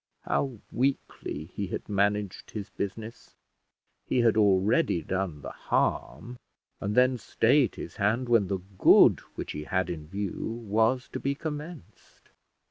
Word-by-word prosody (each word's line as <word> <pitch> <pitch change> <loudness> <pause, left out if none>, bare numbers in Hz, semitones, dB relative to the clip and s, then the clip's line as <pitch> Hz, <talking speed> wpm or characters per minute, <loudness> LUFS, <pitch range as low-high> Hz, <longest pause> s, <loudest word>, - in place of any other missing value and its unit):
How 130 -4 -1
weakly 125 - -2
he 100 - -3
had - - -5
managed 100 -1 -1
his 105 -2 -7
business! 110 +4 -6 0.7
he 125 - +2
had 115 -2 +4
already 100 - +3
done 95 -6 -3
the - - -6
harm, 120 +2 -2 0.4
and 100 +1 -2
then 125 0 +4
stayed 125 +2 +2
his 85 - -8
hand 110 +5 +1
when 115 -5 +3
the 95 -1 -2 0.2
good - - +7 0.2
which - - -5
he 75 0 -6
had 95 -1 -1
in 75 -3 -7
view 100 +5 -4
was 115 +5 +2
to - - -5
be 140 +1 -1
commenced. 150 - -8
105 Hz, 140 wpm, -28 LUFS, 95-125 Hz, 0.7 s, good